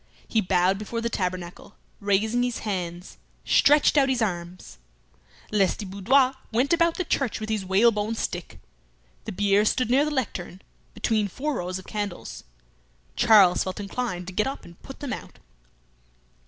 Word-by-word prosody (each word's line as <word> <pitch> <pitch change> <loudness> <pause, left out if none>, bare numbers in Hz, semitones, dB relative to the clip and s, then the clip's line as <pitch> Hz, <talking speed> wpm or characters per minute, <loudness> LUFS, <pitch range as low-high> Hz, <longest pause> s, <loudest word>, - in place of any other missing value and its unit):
He 220 - +1
bowed 185 +1 +2
before 220 +2 -4
the 235 0 -2
tabernacle, 180 +1 -4 0.2
raising 215 +4 +1
his 245 -2 -2
hands, 180 -3 -4 0.3
stretched 295 +1 +5
out 270 -1 +3
his 260 -2 +1
arms. 180 -4 -4 0.7
Lestiboudois 210 +6 +2 0.2
went 250 +7 +2
about 335 0 +3
the 370 - 0
church 275 -6 -1
with 215 0 -5
his 215 -3 -1
whalebone 210 +3 +2
stick. - - -5 0.7
The 220 - -4
bier 205 +1 +2
stood 235 +2 +1
near 270 +3 +4
the 300 - -1
lectern, 195 -10 -4 0.3
between 215 -3 0
four 290 +10 -3
rows 180 +1 -3
of 190 - -11
candles. 205 -4 -5 0.7
Charles 195 -5 +5
felt 185 +1 -5
inclined 200 -3 -4
to 185 - -8
get 210 +5 +1
up 275 - -6
and 170 0 -15
put 270 - -11
them 280 -3 -3
out. - - -9
210 Hz, 155 wpm, -25 LUFS, 185-245 Hz, 0.7 s, stretched